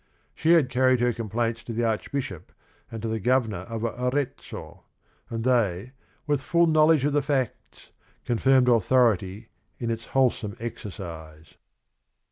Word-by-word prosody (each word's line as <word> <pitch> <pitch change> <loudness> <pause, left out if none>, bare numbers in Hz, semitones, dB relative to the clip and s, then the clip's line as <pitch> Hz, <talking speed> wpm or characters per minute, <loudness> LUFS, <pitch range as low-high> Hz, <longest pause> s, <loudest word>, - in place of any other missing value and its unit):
She 165 +2 +3
had 145 -7 +3
carried 130 0 +3
her 120 0 +2
complaints 115 +1 -2
to 115 - -6
the 120 +2 -1
Archbishop 110 - -3 0.4
and 115 -1 -7
to - - -1
the 110 0 -2
Governor 110 -5 0
of 115 -1 -4
Arezzo, 125 +4 -4 0.5
and 115 -1 -4
they, 115 -3 +1 0.3
with 145 -3 0
full 170 +7 +3
knowledge 155 -3 +4
of 145 - +1
the 145 - +3
facts 135 -4 -3 0.3
"con 120 -2 -1
firmed 130 -2 +4
authority 110 -3 +2 0.3
in 115 -1 -2
its 115 0 -4
wholesome 120 -5 0
exercise." 85 -9 -8
120 Hz, 140 wpm, -26 LUFS, 110-130 Hz, 0.5 s, knowledge